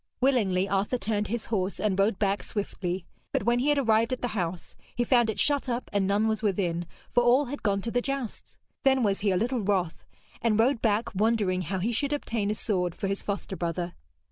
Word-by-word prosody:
Willingly 205 -8 +2
Arthur 200 +5 0
turned 210 -3 -1
his 235 +1 -3
horse 190 -1 -1
and 200 -2 0
rode 200 0 +3
back 200 -1 +1
swiftly. 185 -3 -3 0.3
But - - 0
when 240 +1 +2
he 275 +4 +1
had 295 - +3
arrived 225 -3 +3
at 255 - -3
the 245 - 0
house, 180 -5 -4 0.2
he 240 - +1
found 240 -2 +3
it 220 - -2
shut 285 -3 +3
up 240 +1 -3
and 200 -2 +2
none 205 +2 +2
was 220 -1 0
within, 175 -5 0 0.2
for 245 - +4
all 245 +4 +4
had 285 +3 -6
gone 200 -2 +1
to 230 - -3
the 245 - +1
jousts. 275 -4 -4 0.2
Then 265 -2 +3
was 200 -2 +1
he 205 - +1
a 185 - +2
little 245 +5 0
wroth, 190 -5 -1 0.4
and 225 -2 +2
rode 245 +1 +3
back 220 0 +1
wondering 205 -3 +1
how 190 +1 -3
he 205 +6 0
should 280 +5 0
obtain 225 -7 -1
a 210 - 0
sword 180 -6 -1
for 195 - -2
his 195 0 -2
foster 200 -1 -4
brother. 175 0 -3
210 Hz, 220 wpm, -27 LUFS, 195-240 Hz, 0.4 s, for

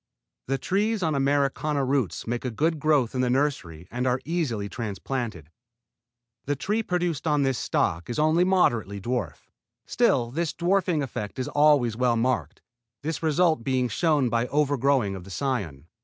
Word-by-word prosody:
The 135 +1 0
trees 205 +5 0
on 160 -2 +1
Americana 140 +1 +1
roots 130 -6 -1
make 120 +1 -3
a 125 - -1
good 155 +7 0
growth 145 -6 +2
in 130 - 0
the 125 - +1
nursery 120 - -1
and 125 +2 -1
are 125 +1 +1
easily 145 -12 -1
transplanted. 105 - -5 0.9
The 145 - 0
tree 210 - -1
produced 175 -6 -2
on 150 -2 +2
this 135 -3 0
stock 85 +5 -1
is 120 - -3
only 155 +3 +3
moderately 120 - +1
dwarf. 105 - -4 0.3
Still 120 -1 +1
this 165 +3 -2
dwarfing 175 -3 +1
effect 105 -4 -5
is 130 - -2
always 145 -6 +3
well 125 0 +2
marked, 115 - -1 0.4
this 160 +1 -3
result 160 -3 +2
being 130 -1 0
shown 150 +2 +2
by 115 0 +1
the - - -9
overgrowing 140 -7 +1
of 95 - -8
the 100 - -12
cion. 100 - -3
135 Hz, 165 wpm, -26 LUFS, 115-155 Hz, 0.9 s, only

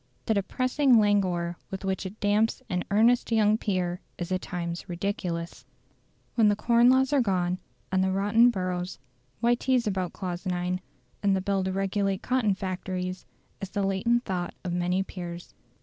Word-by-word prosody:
The 220 - +2
depressing 255 +6 +2
languor 185 -5 +2
with 190 0 -5
which 190 0 -1
it 200 +4 -11
damps 210 +2 +1
an 180 0 0
earnest 230 +4 +3
young 215 -1 +4
peer 180 -3 -1 0.2
is 175 +1 -5
at 185 0 0
times 170 +1 -5
ridiculous. 175 -2 -3 0.7
"When 225 -3 +4
the 205 - +4
Corn 235 +3 +4
Laws 265 +2 +3
are 280 - +4
gone, 185 -4 0 0.3
and 190 0 +2
the 190 - +1
rotten 205 +5 +4
boroughs, 185 -4 -3 0.4
why 240 0 +4
tease 250 0 +1
about 190 -4 -1
Clause 180 -2 -5
IX. 180 0 -1 0.4
in 200 -1 +3
the - - +1
Bill 195 0 0
to 190 - -1
regulate 195 0 -1
Cotton 245 -6 +1
Factories?" 185 -1 -4 0.3
is 195 - -4
the 200 0 -1
latent 215 +6 +1
thought 180 -3 -3
of 180 -2 -3
many 180 +2 +1
peers. 175 -2 -8
195 Hz, 165 wpm, -27 LUFS, 180-215 Hz, 0.7 s, young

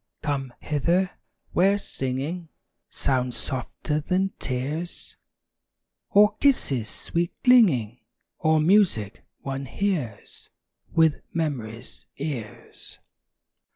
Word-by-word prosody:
Come 140 -4 -2
hither, 170 +6 +1 0.4
where 195 +3 +4
singing 150 +2 -4 0.4
Sounds 125 -2 0
softer 140 +3 -2
than 185 +5 0
tears, 145 +7 -4 0.9
Or 210 +1 +5
kisses, 135 - +2
sweet 170 0 -2
clinging, 155 - +5 0.4
Or 155 -1 +3
music 155 - +3 0.2
one 135 0 -4
hears 155 - -3 0.4
With 160 -2 +3
memory's 125 -8 -4
ears. 135 -8 -6
150 Hz, 85 wpm, -25 LUFS, 125-180 Hz, 0.9 s, Or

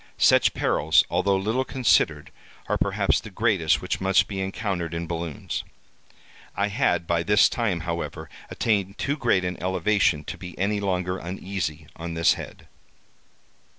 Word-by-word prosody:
Such - - +4
perils, 80 +3 +3
although 95 +3 +2
little 110 +7 0
considered, 130 -2 +1 0.4
are - - 0
perhaps - - +1
the - - -10
greatest 95 -8 +1
which 90 - -2
must 95 0 +3
be 95 -2 -4
encountered 95 -4 -3
in 85 0 -3
balloons. 85 -2 -4 0.9
I 100 +1 +1
had 95 -7 +1
by 85 0 +1
this 105 +4 +5
time, 105 -8 -1
however, 85 0 -4 0.2
attained 100 -3 -1
too 140 - -1
great 115 -10 +1
an 90 0 -4
elevation 95 -3 +1
to - - -7
be 90 -2 -9
any 100 +2 0
longer 90 -2 -1
uneasy 85 -3 -4
on 85 0 -6
this 80 0 +4
head. - - -10
95 Hz, 150 wpm, -25 LUFS, 85-100 Hz, 0.9 s, this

